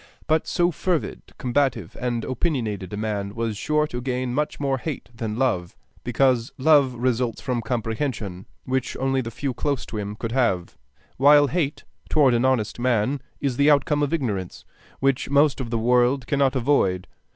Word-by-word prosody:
But 160 0 +1
so 175 0 +2
fervid, 175 0 -2 0.2
combative, 125 - 0
and 120 -2 -2
opinionated 115 - -2
a 105 - -4
man 105 -1 -3
was 115 -2 -2
sure 150 +8 +1
to 125 -5 -5
gain 125 -1 -2
much 150 +3 -1
more 135 -2 0
hate 150 -3 -5
than 115 -2 -4
love; 110 -10 0 0.3
because 125 0 +2
love 140 -2 +4
results 120 -1 0
from 125 -3 -2
comprehension, 115 -4 -3 0.2
which 130 -1 -2
only 135 0 +1
the 115 - -5
few 130 +3 -3
close 140 +1 -2
to 110 - -6
him 105 0 -4
could 115 +1 -5
have, 115 -9 0 0.4
while 145 +2 +7
hate 155 -4 -1 0.3
toward 140 -1 +4
an 120 +2 +2
honest 120 -4 0
man 125 +2 +1 0.2
is 135 -4 -1
the 145 +1 +4
outcome 145 0 +3
of 145 - 0
ignorance, 110 - -3 0.4
which 135 -1 +1
most 140 -1 +3
of 120 - -5
the 115 - 0
world 125 +3 +2
cannot 140 +2 +1
avoid. 115 -9 +2
125 Hz, 170 wpm, -24 LUFS, 115-140 Hz, 0.4 s, while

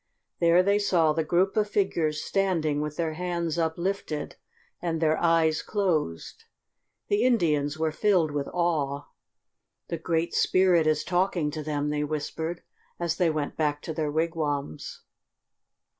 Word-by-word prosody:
There 170 +1 +5
they 200 +2 +3
saw 170 -6 +3
the 160 - 0
group 180 +5 +1
of 210 -1 +1
figures 165 -7 0
standing 165 -7 0
with 150 0 -4
their 165 -2 -1
hands 170 -1 -2
uplifted, 165 -1 -2 0.5
and 165 -2 -1
their 155 -1 +3
eyes 165 -2 +3
closed. 165 - -2 0.6
The 205 +2 +2
Indians 155 - +2
were 160 0 0
filled 180 -3 +2
with 145 -1 -2
awe. 150 -5 -1 0.9
"The 170 - -3
Great 165 0 -1
Spirit 180 -4 +3
is 155 -1 +2
talking 180 -4 0
to 155 - -5
them," 150 -1 -2
they 150 0 -1
whispered, 160 +3 -4 0.4
as 170 -1 -1
they 175 -2 +3
went 155 -2 -2
back 150 -2 0
to 160 - -4
their 155 -2 -2
wigwams. 155 - -2
160 Hz, 145 wpm, -27 LUFS, 150-175 Hz, 0.9 s, There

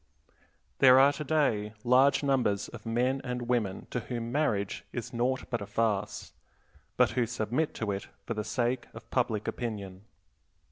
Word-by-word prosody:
There 130 -1 +8
are 140 +2 +6
today 140 -9 0
large 130 +4 +4
numbers 125 -8 +1
of 115 -1 -10
men 125 +4 +1
and 125 -1 -3
women 120 -6 -1
to 125 - -1
whom 120 0 -5
marriage 115 -9 0
is 120 +1 -5
naught 125 +2 0
but 120 - -1
a 100 - -5
farce, 105 -1 -1 0.6
but - - +4
who 120 -2 +1
submit 120 +10 -1
to 110 -2 -2
it 100 0 -4 0.2
for 115 - -2
the 105 -1 -3
sake 120 +3 -1
of - - -12
public 105 -1 0
opinion. 100 -5 -5
120 Hz, 155 wpm, -29 LUFS, 105-130 Hz, 0.6 s, There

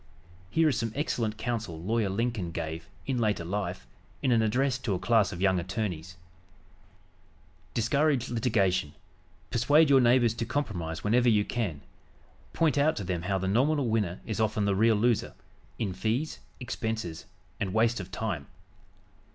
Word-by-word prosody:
Here 160 +10 +3
is 140 - +1
some 115 -1 -2
excellent 115 -7 -1
counsel 110 -8 -3
Lawyer 105 +4 0
Lincoln 110 -2 -1
gave, 80 0 -5 0.2
in 130 -3 -1
later 105 -7 0
life, 95 0 -3 0.4
in 130 - +2
an 115 -2 +4
address 125 +4 +1
to 105 -6 -1
a - - -3
class 110 +1 +3
of 85 - -6
young 95 -2 +3
attorneys: 90 -2 -4 1.6
"Discourage 135 +2 +2
litigation. 100 - +1 0.6
Persuade 145 +5 +4
your 135 -1 +7
neighbors 120 -1 +4
to 115 - -3
compromise 85 - -3
whenever 120 +3 +3
you 105 -2 +3
can. 95 -12 -3 0.7
Point 155 -3 +2
out 155 +2 +3
to 100 - -4
them 90 -2 -2
how 95 +2 0
the 95 0 -2
nominal 130 +5 +2
winner 105 -5 0
is 110 -3 -3
often 110 -1 +1
the 100 - +2
real 110 +3 +4
loser 115 +2 +1 0.4
in 105 -5 -2
fees, 110 - -2 0.2
expenses 110 -8 -4 0.3
and 95 - -1
waste 115 +2 +2
of 95 -1 -7
time. 95 -8 -3
110 Hz, 155 wpm, -28 LUFS, 95-120 Hz, 1.6 s, your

